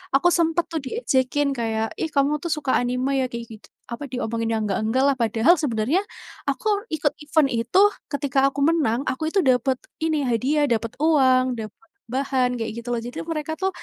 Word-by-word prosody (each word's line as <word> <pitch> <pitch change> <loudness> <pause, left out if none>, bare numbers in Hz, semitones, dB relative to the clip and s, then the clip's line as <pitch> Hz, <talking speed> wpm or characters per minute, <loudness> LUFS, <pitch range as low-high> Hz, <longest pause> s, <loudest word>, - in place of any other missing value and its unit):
aku 315 +6 +4
sempet 335 0 +2
tuh 325 - -1
diejekin 280 - 0
kayak, 225 -3 -2
"Ih 320 - -1
kamu 290 0 +1
tuh 340 - -3
suka 295 -4 -1
anime 250 +2 -1
ya?" - - +1
kayak 235 0 -5
gitu 215 - -14 0.2
apa, 235 +4 -5
diomongin 230 -2 -2
yang 220 - 0
nggak-nggak 220 +6 0
lah 280 - +4
padahal 230 - +4
sebenarnya, 260 - +1 0.5
aku 445 - -2 0.3
ikut 290 -2 0
event 295 -2 +2
itu, 230 +7 0 0.3
ketika 285 -2 0
aku 275 - -7
menang 280 -8 +1
aku 290 +5 -2
itu 390 - +1
dapat 255 0 +2 0.3
ini 310 -3 +1
hadiah, 260 +5 +1
dapat 230 0 -1
uang, 260 -5 +4
dapat 220 - -10 0.2
bahan 260 0 0
kayak 225 -1 -3
gitu 245 - -17
loh, - - 0
jadi 245 +1 -7
mereka 315 -1 -3
tuh, 380 - +2
260 Hz, 180 wpm, -23 LUFS, 235-300 Hz, 0.5 s, aku